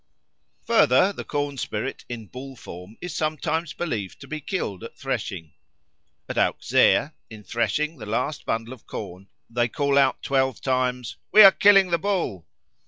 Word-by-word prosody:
Further, 185 +11 +4
the - - -6
corn 145 -1 -3
spirit 110 +5 -4
in 115 -2 -6
bull 130 +5 -9
form 90 -1 -11
is 180 - -5
sometimes 155 +1 -1
believed 110 - -4
to - - -10
be 155 -1 -5
killed 135 - -4
at - - -10
threshing. 80 -5 -4 0.7
At - - -2
Auxerre, - - +3 0.2
in 110 -1 -11
threshing 125 - -1
the 105 - -8
last 125 +7 -2
bundle 115 +2 -3
of 125 - -16
corn, 95 -2 -8 0.2
they 120 0 0
call 140 +3 +1
out 135 -1 +2
twelve 130 -3 +1
times, 125 -2 -1
"We 215 - +9
are 195 - +11
killing 195 -2 +5
the 170 - +2
Bull." 170 - -2
130 Hz, 160 wpm, -24 LUFS, 110-155 Hz, 0.7 s, are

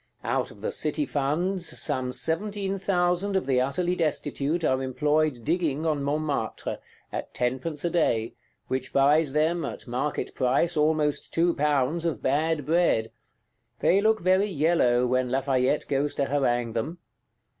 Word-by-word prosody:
Out - - -1
of - - -15
the - - -2
City 300 - -1
funds, 170 - -1
some 130 -1 -1
seventeen 195 +6 -2
thousand 180 +1 +1
of 190 - +1
the 130 -2 +2
utterly 175 +7 0
destitute 155 0 -1
are 130 -3 +2
employed 150 0 0
digging 160 -2 0
on 155 -3 0
Montmartre, 145 -4 -2 0.3
at - - -6
tenpence 130 +6 -2
a 170 - 0
day, 115 -10 +1 0.3
which 130 0 -3
buys 145 +1 +3
them, 160 +3 +1
at - - -6
market 130 +5 -2
price, 140 +7 +1
almost 150 -1 +1
two 170 +1 +2
pounds 150 +2 +1
of 165 -2 -1
bad 150 +2 +1
bread;—they 170 - -1
look 220 +1 +2
very 185 +3 +3
yellow, 145 -7 +2
when 130 0 +1
Lafayette 130 +1 +1
goes 140 +1 0
to 140 - +1
harangue 120 -5 0
them. 135 +10 -3
150 Hz, 145 wpm, -26 LUFS, 130-170 Hz, 0.3 s, buys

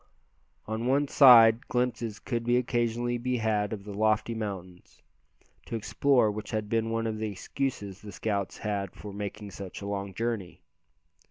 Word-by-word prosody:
On 110 +2 -3
one 140 +2 +2
side 120 -4 +7
glimpses 120 -3 -1
could 120 -2 -3
occasionally 120 0 +1
be 125 +1 -1
had 105 -2 0
of 105 -3 -5
the 105 0 -8
lofty 110 +2 +1
mountains, 95 -5 -7 0.6
to - - -4
explore 120 +1 +2
which 105 0 -6
had 110 -1 -3
been 115 0 0
one 115 0 -1
of 110 -1 -2
the 110 0 -2
excuses 100 0 -4
the 105 - -9
scouts 100 -3 -2
had 100 -3 -3
for 105 -1 -9
making 105 0 -6
such 95 -1 -8
a 100 - -7
long 100 -1 -4
journey. 115 -5 -3
110 Hz, 160 wpm, -28 LUFS, 100-120 Hz, 0.6 s, side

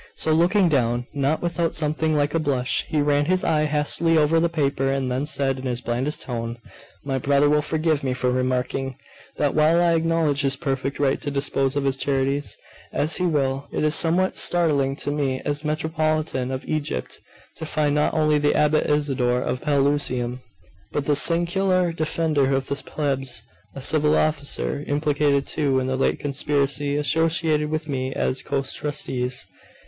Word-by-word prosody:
So 160 - +2
looking 180 +4 +3
down, 120 -5 +1
not 145 +3 0
without 170 -1 -1
something 155 0 0
like 145 0 +1
a 165 - +2
blush, 135 -5 0
he 150 -2 0
ran 145 0 +2
his 185 +3 +1
eye 155 -1 +2
hastily 150 +2 +1
over 155 +2 +3
the 170 +1 +2
paper; 140 -4 0
and 135 -2 -1
then 130 +4 -1
said, 135 -3 0
in 130 - -5
his 120 -1 -1
blandest 125 +5 -2
tone 115 -2 -4 0.5
'My 135 -1 -1
brother 140 +2 +3
will 150 +1 +3
forgive 155 -1 0
me 130 -1 0
for 125 0 0
remarking, 130 +1 -1 0.4
that 145 -2 +1
while 155 +2 +4
I 175 -1 +3
acknowledge 165 -3 +1
his 140 -1 +1
perfect 135 -1 -3
right 140 -2 +1
to 145 - -3
dispose 140 -1 0
of 145 - 0
his 135 -1 0
charities 140 +1 -1 0.3
as 155 +3 +1
he 180 - +1
will, 140 -3 -1
it - - -2
is 155 0 +2
somewhat 175 +3 +2
startling 145 -6 +1
to 145 - -3
me, 140 -3 -1
as 145 +1 -2
Metropolitan 155 -3 -1
of 130 0 -4
Egypt 145 - -3 0.4
to 160 - -5
find 150 -2 0
not 150 +2 +1
only 155 -1 +3
the 145 0 +2
Abbot 150 +1 +2
Isidore 130 -4 +1
of 125 - -3
Pelusium, 135 -4 0 0.5
but 145 - -2
the 145 - +2
secular 175 +3 +2
Defender 155 -4 0
of 135 0 -2
the 140 - 0
Plebs, 135 -6 -3 0.3
a 135 - -6
civil 150 +1 +2
officer, 145 -1 -1
implicated, 145 -1 +1
too, 140 -4 0
in 130 - -2
the 130 0 -1
late 135 - +1
conspiracy, 145 0 0
associated 160 0 +1
with 155 0 -3
me 130 -2 -2
as 130 - -1
co 135 - -2
trustees. 130 -3 -2
145 Hz, 175 wpm, -23 LUFS, 135-155 Hz, 0.5 s, while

